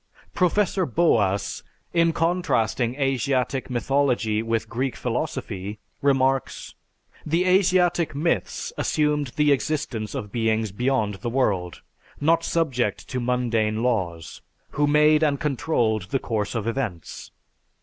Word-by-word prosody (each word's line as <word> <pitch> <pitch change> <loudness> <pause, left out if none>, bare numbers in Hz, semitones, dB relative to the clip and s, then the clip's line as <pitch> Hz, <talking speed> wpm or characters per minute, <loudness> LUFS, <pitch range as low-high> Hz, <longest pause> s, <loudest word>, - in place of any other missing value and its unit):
Professor 190 +1 +1
Boas, 105 - +1 0.3
in 170 -1 +3
contrasting 135 -9 0
Asiatic 135 -1 0
mythology 125 -4 +1
with 115 0 -1
Greek 130 +2 -2
philosophy, 115 -6 -4 0.2
remarks: 135 -2 +1 0.5
"The 165 +4 +1
Asiatic 180 -3 +3
myths 145 - -1
assumed 150 -1 +1
the 150 -1 +3
existence 135 -7 -1
of 105 -1 -5
beings 110 -2 0
beyond 115 -1 0
the 120 - -2
world, 100 -9 -1 0.4
not 165 +3 +3
subject 130 - -1
to 130 - -2
mundane 115 -3 0
laws, 90 -10 -2 0.3
who 145 0 +1
made 150 +1 +4
and 145 -3 +2
controlled 120 - 0
the 135 - +1
course 110 -3 -3
of 110 -2 -2
events. 115 - -4
130 Hz, 115 wpm, -24 LUFS, 110-150 Hz, 0.5 s, made